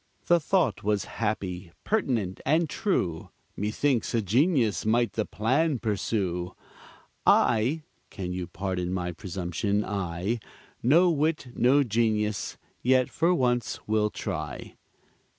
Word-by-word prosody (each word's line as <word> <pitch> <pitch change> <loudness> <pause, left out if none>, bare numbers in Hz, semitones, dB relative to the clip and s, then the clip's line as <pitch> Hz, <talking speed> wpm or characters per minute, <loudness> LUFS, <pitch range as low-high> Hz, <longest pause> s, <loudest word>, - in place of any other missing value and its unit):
The 175 0 +4
thought 160 - +1
was 105 -1 +1
happy, 95 -5 -3
pertinent, 120 - 0
and 160 +2 +2
true; 95 - -1 0.3
Methinks 115 +4 0
a 115 - +2
genius 120 - +2
might 115 +2 +2
the 110 - -1
plan 130 - +1
pursue. 95 -5 -2 0.7
I 120 +8 +3 0.3
(can 90 -2 -5
you 90 -1 -4
pardon 90 -1 -3
my 90 -1 -2
presumption), 95 +3 -2
I 95 +3 -2 0.4
No 170 +8 +5
wit, 155 -3 0
no 135 +5 +4
genius 110 -3 0 0.2
yet 130 0 +3
for 165 +3 +2
once 120 -5 0
will 105 0 +2
try. 75 -10 -5
110 Hz, 115 wpm, -27 LUFS, 95-130 Hz, 0.7 s, No